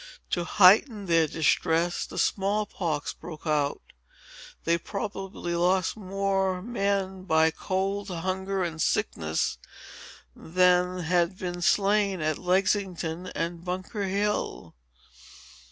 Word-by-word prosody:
To 175 Hz, -1 st, 0 dB
heighten 205 Hz, +4 st, +5 dB
their 165 Hz, -3 st, +3 dB
distress, 165 Hz, +2 st, +1 dB
the -, -, -9 dB
small 205 Hz, +2 st, +1 dB
pox 160 Hz, -8 st, -3 dB
broke 160 Hz, -2 st, -10 dB
out. 150 Hz, -2 st, 0 dB, 0.8 s
They 170 Hz, 0 st, +2 dB
probably 195 Hz, -3 st, -5 dB
lost 180 Hz, +1 st, +2 dB
far 215 Hz, -, -12 dB
more 195 Hz, -1 st, 0 dB
men 195 Hz, -4 st, -1 dB
by 160 Hz, -2 st, +4 dB
cold, 195 Hz, +3 st, -2 dB
hunger, 190 Hz, +2 st, -2 dB
and 165 Hz, -2 st, -3 dB
sickness, 80 Hz, -1 st, 0 dB, 0.8 s
than 180 Hz, +1 st, +2 dB
had 175 Hz, +2 st, +1 dB
been 175 Hz, -1 st, -4 dB
slain 200 Hz, +1 st, +2 dB
at 155 Hz, -1 st, -1 dB
Lexington 185 Hz, -2 st, 0 dB
and 170 Hz, 0 st, -3 dB
Bunker 185 Hz, +3 st, -3 dB
Hill." 200 Hz, -, -2 dB
185 Hz, 110 wpm, -27 LUFS, 170-195 Hz, 0.8 s, heighten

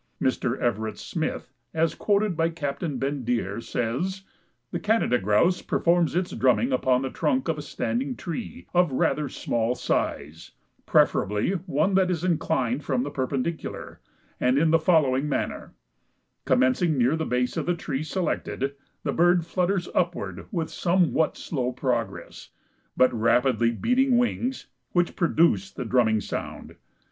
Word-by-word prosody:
Mr. 130 Hz, -1 st, 0 dB
Everett 110 Hz, -2 st, -1 dB
Smith, 160 Hz, -5 st, -4 dB, 0.2 s
as 160 Hz, 0 st, +2 dB
quoted 205 Hz, -2 st, +1 dB
by 165 Hz, +1 st, +1 dB
Captain 145 Hz, -2 st, -3 dB
Bendire, 120 Hz, -6 st, -2 dB
says, 160 Hz, +14 st, -2 dB, 0.5 s
"The -, -, -2 dB
Canada 210 Hz, -, +2 dB
Grouse 105 Hz, -, +2 dB
performs 170 Hz, -1 st, +1 dB
its 180 Hz, 0 st, 0 dB
drumming 125 Hz, -1 st, +2 dB
upon 130 Hz, 0 st, +2 dB
the 130 Hz, -, -3 dB
trunk 260 Hz, -1 st, 0 dB
of 160 Hz, -2 st, -1 dB
a -, -, -3 dB
standing 125 Hz, -1 st, -2 dB
tree 220 Hz, -, -6 dB
of 175 Hz, -3 st, +3 dB
rather 145 Hz, +2 st, 0 dB
small 120 Hz, 0 st, -1 dB
size, 75 Hz, -, -3 dB, 0.3 s
preferably 105 Hz, -, +2 dB, 0.2 s
one 155 Hz, +8 st, +1 dB
that 190 Hz, -1 st, +3 dB
is 175 Hz, -2 st, -1 dB
inclined 150 Hz, -7 st, 0 dB
from 130 Hz, -4 st, 0 dB
the 145 Hz, -, -4 dB
perpendicular, 140 Hz, +3 st, -3 dB, 0.4 s
and 125 Hz, +2 st, +2 dB
in 160 Hz, +2 st, +3 dB
the 165 Hz, -, +5 dB
following 150 Hz, -4 st, +2 dB
manner: -, -, -3 dB, 0.7 s
Commencing 130 Hz, +5 st, +2 dB
near 130 Hz, +4 st, +3 dB
the 160 Hz, -, -2 dB
base 125 Hz, -3 st, -1 dB
of -, -, -2 dB
the 175 Hz, -, +2 dB
tree 135 Hz, -4 st, -3 dB
selected, 155 Hz, -5 st, -2 dB, 0.3 s
the 140 Hz, -, -1 dB
bird 175 Hz, 0 st, +3 dB
flutters 180 Hz, +1 st, 0 dB
upward 100 Hz, -, -2 dB
with 165 Hz, -2 st, -2 dB
somewhat 170 Hz, -3 st, +1 dB
slow 130 Hz, -6 st, -2 dB
progress, 120 Hz, -5 st, -3 dB, 0.5 s
but 130 Hz, 0 st, +4 dB
rapidly 115 Hz, +1 st, +2 dB
beating 250 Hz, -, +2 dB
wings, 245 Hz, +1 st, -1 dB, 0.3 s
which 175 Hz, -1 st, +1 dB
produce 170 Hz, +3 st, +2 dB
the 125 Hz, -, -6 dB
drumming 110 Hz, -3 st, +2 dB
sound. -, -, -6 dB
145 Hz, 140 wpm, -25 LUFS, 125-175 Hz, 0.7 s, the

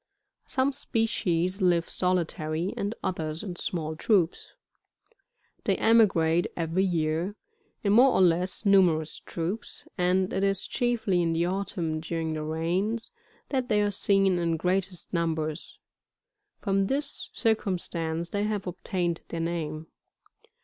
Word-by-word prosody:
Some 265 Hz, +1 st, +1 dB
species 195 Hz, -7 st, 0 dB
live 175 Hz, -2 st, +3 dB
solitary, 170 Hz, -1 st, -1 dB
and 205 Hz, +3 st, -2 dB
others 160 Hz, -2 st, -3 dB
in 185 Hz, -4 st, -5 dB
small 160 Hz, -3 st, -3 dB
troops. 180 Hz, -1 st, +1 dB, 1.1 s
They -, -, +3 dB
emigrate 180 Hz, -7 st, +4 dB
every 165 Hz, +2 st, +1 dB
year, 170 Hz, +1 st, 0 dB, 0.5 s
in 200 Hz, -1 st, +3 dB
more 250 Hz, +5 st, +7 dB
or -, -, +3 dB
less 180 Hz, +3 st, +2 dB
numerous 175 Hz, -6 st, +3 dB
troops, 180 Hz, +6 st, -5 dB
and 185 Hz, +1 st, +2 dB
it 190 Hz, -, 0 dB
is 195 Hz, -1 st, +1 dB
chiefly 230 Hz, -7 st, +1 dB
in 165 Hz, -1 st, +1 dB
the 165 Hz, +1 st, +1 dB
autumn 180 Hz, -4 st, -2 dB
during 160 Hz, 0 st, -3 dB
the 155 Hz, -, -3 dB
rains, 175 Hz, +9 st, -1 dB, 0.4 s
that 260 Hz, -2 st, -1 dB
they 210 Hz, -2 st, +3 dB
are 205 Hz, -, +1 dB
seen 195 Hz, -2 st, +2 dB
in 165 Hz, -1 st, 0 dB
greatest 185 Hz, +2 st, -2 dB
numbers; 160 Hz, -2 st, -2 dB, 0.8 s
from 195 Hz, -1 st, +1 dB
this 280 Hz, +4 st, -3 dB
circumstance 170 Hz, -6 st, -1 dB
they 205 Hz, 0 st, 0 dB
have 210 Hz, -2 st, -2 dB
obtained 175 Hz, -1 st, -2 dB
their 170 Hz, -, -5 dB
name. 160 Hz, -2 st, -3 dB
180 Hz, 130 wpm, -27 LUFS, 165-200 Hz, 1.1 s, more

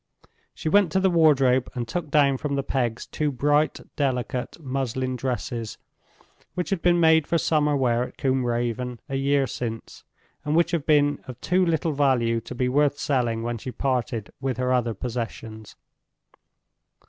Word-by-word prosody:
She -, -, -5 dB
went 195 Hz, 0 st, +4 dB
to 190 Hz, -, +3 dB
the 190 Hz, -1 st, +2 dB
wardrobe 135 Hz, -6 st, +4 dB
and 120 Hz, -2 st, -3 dB
took 160 Hz, +5 st, -4 dB
down 140 Hz, -2 st, +3 dB
from 140 Hz, +1 st, -2 dB
the 140 Hz, -, -1 dB
pegs 120 Hz, -4 st, -2 dB
two 150 Hz, -1 st, -2 dB
bright, 145 Hz, +4 st, +1 dB
delicate 130 Hz, 0 st, -2 dB
muslin 130 Hz, -2 st, -2 dB
dresses, 120 Hz, -3 st, -4 dB, 0.8 s
which 180 Hz, +1 st, -3 dB
had 190 Hz, -4 st, 0 dB
been 175 Hz, -1 st, +3 dB
made 160 Hz, -2 st, +4 dB
for 170 Hz, -, +2 dB
summer 150 Hz, -3 st, +2 dB
wear 120 Hz, -2 st, +1 dB
at -, -, -13 dB
Combe 130 Hz, -1 st, +1 dB
Raven 120 Hz, 0 st, -2 dB
a 135 Hz, -, -4 dB
year 140 Hz, 0 st, +2 dB
since, 115 Hz, -3 st, -6 dB, 0.4 s
and 150 Hz, +1 st, -1 dB
which 170 Hz, +1 st, +3 dB
had 165 Hz, -4 st, -2 dB
been 145 Hz, -2 st, +3 dB
of 125 Hz, -1 st, -8 dB
too 185 Hz, +6 st, +2 dB
little 165 Hz, -2 st, 0 dB
value 125 Hz, -5 st, +2 dB
to 125 Hz, -, -9 dB
be 125 Hz, +1 st, 0 dB
worth 145 Hz, +2 st, +2 dB
selling 120 Hz, -6 st, 0 dB
when 120 Hz, 0 st, -3 dB
she 130 Hz, -, -6 dB
parted 125 Hz, -4 st, -2 dB
with 130 Hz, -3 st, -2 dB
her 130 Hz, 0 st, +1 dB
other 120 Hz, -3 st, 0 dB
possessions. 110 Hz, -2 st, -6 dB
135 Hz, 170 wpm, -25 LUFS, 120-150 Hz, 0.8 s, went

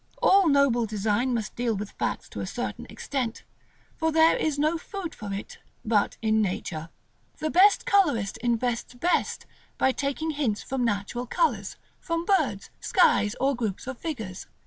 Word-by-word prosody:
All 390 Hz, -2 st, +5 dB
noble 275 Hz, -5 st, +3 dB
design 215 Hz, +4 st, 0 dB
must 225 Hz, -3 st, -2 dB
deal 235 Hz, -2 st, 0 dB
with 205 Hz, +1 st, -5 dB
facts -, -, -3 dB
to -, -, -7 dB
a -, -, -3 dB
certain -, -, -4 dB
extent, 250 Hz, -5 st, -3 dB, 0.5 s
for 320 Hz, 0 st, +1 dB
there 320 Hz, +1 st, +5 dB
is 305 Hz, -2 st, 0 dB
no 310 Hz, +3 st, +1 dB
food 370 Hz, -2 st, -6 dB
for 205 Hz, -1 st, -7 dB
it 195 Hz, +1 st, -6 dB, 0.3 s
but 215 Hz, -2 st, +1 dB
in 220 Hz, 0 st, +3 dB
nature. 170 Hz, -5 st, -3 dB, 0.5 s
The 310 Hz, 0 st, -2 dB
best 395 Hz, +3 st, +5 dB
colorist 295 Hz, -, +2 dB
invents 240 Hz, 0 st, -1 dB
best 345 Hz, +8 st, 0 dB, 0.3 s
by 265 Hz, -, +3 dB
taking 280 Hz, +4 st, -2 dB
hints 265 Hz, -9 st, -1 dB
from 265 Hz, -1 st, -2 dB
natural 230 Hz, +2 st, -2 dB
colors; -, -, 0 dB, 0.2 s
from 335 Hz, 0 st, -2 dB
birds, 390 Hz, 0 st, +1 dB
skies, 220 Hz, -, +3 dB
or 275 Hz, +1 st, +2 dB
groups 225 Hz, -2 st, -3 dB
of 265 Hz, +1 st, -5 dB
figures. 220 Hz, -, -5 dB
250 Hz, 160 wpm, -26 LUFS, 215-315 Hz, 0.5 s, All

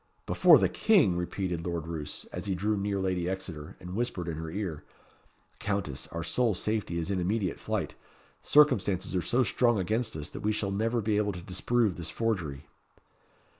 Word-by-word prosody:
"Before -, -, +7 dB
the -, -, +3 dB
King!" 185 Hz, -, +4 dB
repeated 90 Hz, -1 st, -2 dB
Lord 85 Hz, -2 st, -3 dB
Roos, 80 Hz, -3 st, -5 dB
as -, -, -4 dB
he 95 Hz, -, 0 dB
drew 105 Hz, +4 st, 0 dB
near 100 Hz, 0 st, -1 dB
Lady 90 Hz, -2 st, 0 dB
Exeter, 90 Hz, -3 st, -6 dB
and 90 Hz, 0 st, -8 dB
whispered 110 Hz, -6 st, -2 dB
in 85 Hz, -, -2 dB
her 80 Hz, 0 st, -5 dB
ear 90 Hz, -4 st, -4 dB, 0.8 s
"Countess, 100 Hz, -9 st, -2 dB
our 85 Hz, 0 st, -5 dB
sole 120 Hz, 0 st, +1 dB
safety 105 Hz, -3 st, -1 dB
is 85 Hz, +3 st, -2 dB
in 95 Hz, -, 0 dB
immediate 95 Hz, 0 st, -1 dB
flight. -, -, -2 dB, 0.5 s
Circumstances 105 Hz, -12 st, +3 dB
are 90 Hz, -, +2 dB
so 125 Hz, +8 st, +2 dB
strong 120 Hz, +1 st, +2 dB
against 110 Hz, +2 st, -1 dB
us, 75 Hz, -, -5 dB
that -, -, -6 dB
we 105 Hz, +1 st, 0 dB
shall 100 Hz, -2 st, -2 dB
never 115 Hz, +4 st, 0 dB
be 105 Hz, 0 st, +1 dB
able 105 Hz, -1 st, +1 dB
to 90 Hz, -, -7 dB
disprove 105 Hz, +2 st, +1 dB
this 85 Hz, -2 st, -4 dB
forgery." 85 Hz, -11 st, -2 dB
95 Hz, 180 wpm, -29 LUFS, 85-110 Hz, 0.8 s, Before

